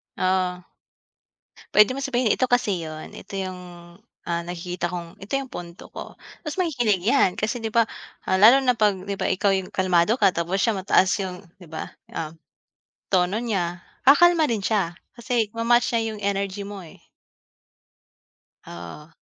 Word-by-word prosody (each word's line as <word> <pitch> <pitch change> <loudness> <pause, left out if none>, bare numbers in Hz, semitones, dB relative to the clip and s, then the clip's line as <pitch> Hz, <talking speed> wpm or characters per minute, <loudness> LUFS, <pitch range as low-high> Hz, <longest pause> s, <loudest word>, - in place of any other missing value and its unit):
Oo. 185 -1 0 1.1
Pwede 210 +3 +6
mo 270 - -4
sabihin, 255 -5 +1
"Ito 255 - +2
kasi 220 -7 +1
yun, 155 -1 -7
ito 195 - -10
yung, 185 -1 -4 0.6
ah, 170 0 -2
nakikita 175 0 -4
kong 170 -1 -7
ito 195 +7 -10
yung 270 -1 -3
punto 170 0 -9
ko." - - -9 0.3
Mas 300 - -3
makikinig 245 - +1
yan. 220 -4 +3
Kasi 215 +3 -1
'di 225 -1 -4
ba 230 0 +4 0.4
ah, 185 - +2
lalo 235 +7 +8
na 250 -1 +3
'pag 210 -3 +3
'di 200 - -2
ba - - 0
Ikaw 200 +2 +2
yung 185 - -9
kalmado 185 +2 +2
ka 190 - +5
tapos 170 +3 -1
siya 225 0 +2
mataas 190 -1 +3
yung 180 0 -6 0.2
'di 180 - -13
ba 160 - -6 0.2
yung, 160 0 -5 0.8
tono 185 +2 +2
niya, 180 -7 -2 0.2
kakalma 330 +4 +6
rin 225 -3 0
siya, 190 -6 0 0.2
kasi 235 -3 0
ma-match 240 +1 +3
niya 230 - +2
yung 210 - -8
energy 200 0 -1
mo, 200 -2 -7
eh. 160 - -14 1.7
Oo. 85 - -10
195 Hz, 160 wpm, -24 LUFS, 180-235 Hz, 1.7 s, lalo